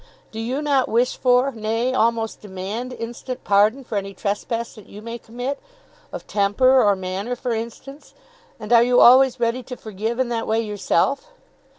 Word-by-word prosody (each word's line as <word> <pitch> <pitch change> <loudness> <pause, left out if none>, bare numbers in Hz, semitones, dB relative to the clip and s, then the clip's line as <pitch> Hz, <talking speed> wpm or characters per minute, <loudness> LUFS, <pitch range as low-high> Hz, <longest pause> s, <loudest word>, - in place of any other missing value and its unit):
Do 220 - -7
you 255 +6 -2
not 280 -3 +1
wish 240 +3 +1
for, 250 +1 +2
nay, 225 +2 -2
almost 230 -2 0
demand, 205 +5 -6
instant 245 +2 -7
pardon 210 +6 +3
for 220 -4 -2
any 195 0 -8
trespass 230 +3 -3
that 215 -4 -15
you 205 - -11
may 230 +2 -7
commit, 245 +5 -5 0.5
of - - -7
temper, 255 +6 +3
or 205 -3 +3
manner, 190 +6 -4
for 245 0 -3
instance? 235 +6 -8 0.4
and 215 +2 -2
are 230 - +7
you 245 +1 +4
always 260 +1 +6
ready 235 +2 0
to 250 0 -9
forgive 220 +2 -4
in 260 -2 0
that 230 -1 -2
way 220 +1 +1
yourself? 210 - 0
230 Hz, 175 wpm, -22 LUFS, 215-250 Hz, 0.5 s, are